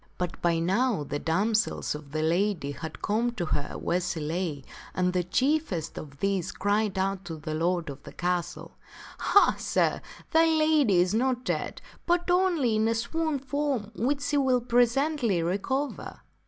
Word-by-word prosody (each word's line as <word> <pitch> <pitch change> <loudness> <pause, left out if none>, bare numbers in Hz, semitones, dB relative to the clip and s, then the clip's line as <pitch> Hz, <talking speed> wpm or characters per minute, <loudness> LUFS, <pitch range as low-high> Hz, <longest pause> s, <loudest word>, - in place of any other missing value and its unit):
But 180 -1 -4
by 170 -1 +2
now 195 - +1
the 145 0 -4
damsels 210 +8 0
of 150 -2 -9
the 155 +1 -1
lady 170 -2 +1
had 155 +3 -8
come 230 +3 +1
to 180 -7 -3
her 145 -2 -3
where 180 +1 0
she 175 -2 -3
lay, 155 -2 -3 0.3
and 180 0 +1
the 180 -1 +1
chiefest 255 - 0
of 140 -2 -9
these 195 -3 0
cried 205 -1 0
out 195 0 -1
to 165 -2 -5
the 155 0 -5
lord 170 +2 0
of 140 -1 -7
the - - -11
castle, 180 -1 -2 0.3
" - - -14
Ha, 405 - +4
sir, - - +1 0.3
thy 325 0 +5
lady 310 - +3
is 180 +2 +3
not 250 +2 0
dead, - - -3 0.2
but 350 0 +2
only 345 -11 +2
in 220 +1 +2
a 230 - +1
swoon 310 +7 -1
from 275 -5 -2
which 275 +5 0
she 290 - 0
will 260 -3 +3
presently 245 - +2
re 180 +4 0
cover." 270 +7 -3
205 Hz, 175 wpm, -27 LUFS, 170-265 Hz, 0.3 s, thy